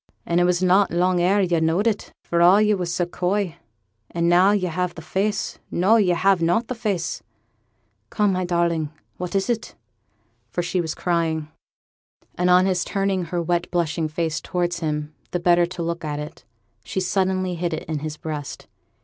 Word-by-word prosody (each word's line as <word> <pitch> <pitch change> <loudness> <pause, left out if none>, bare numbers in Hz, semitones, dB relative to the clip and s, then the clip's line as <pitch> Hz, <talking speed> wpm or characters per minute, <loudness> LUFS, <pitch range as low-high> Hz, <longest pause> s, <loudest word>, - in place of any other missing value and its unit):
And 170 +1 +1
it 175 - +4
was 180 0 +1
not 190 +2 +4
long 180 +1 +2
ere 195 +3 +3
yo' 175 -3 +2
knowed 160 +6 +1
it, 220 -3 -1
for 170 0 0
all 180 +4 +7
yo' 210 0 +3
were 180 -2 -3
so 175 +1 0
coy, 180 0 -1 0.5
and 170 0 0
now 180 +3 +5
yo' 200 -3 +1
have 180 +1 -2
the 160 - -8
face 200 +5 -2
no, 195 +6 +3
yo' 185 -5 +3
have 190 0 +3
not 175 +8 +2
the - - -1
face 205 -8 -2 0.9
come, 210 -1 +2
my 185 0 -1
darling, 170 -3 0 0.3
what 180 +1 -5
is 195 -1 +1
it?' 235 -2 -2 0.7
for 175 - -2
she 175 +1 0
was 160 -2 -4
crying; 165 -3 -1 0.8
and 180 0 0
on 180 +1 +6
his 185 -2 +1
turning 195 -2 -1
her 170 +1 -2
wet 175 +1 0
blushing 165 -2 0
face 160 0 -2
towards 175 -1 -2
him 150 -2 -3 0.2
the 180 - -2
better 175 0 +4
to 175 -1 -5
look 170 +1 -3
at 150 -1 -3
it, 150 0 -8 0.4
she 115 - -3
suddenly 185 0 0
hid 175 0 -2
it 160 - -3
in 155 -1 -3
his 155 0 -5
breast. 150 -3 -6
175 Hz, 190 wpm, -23 LUFS, 170-185 Hz, 0.9 s, all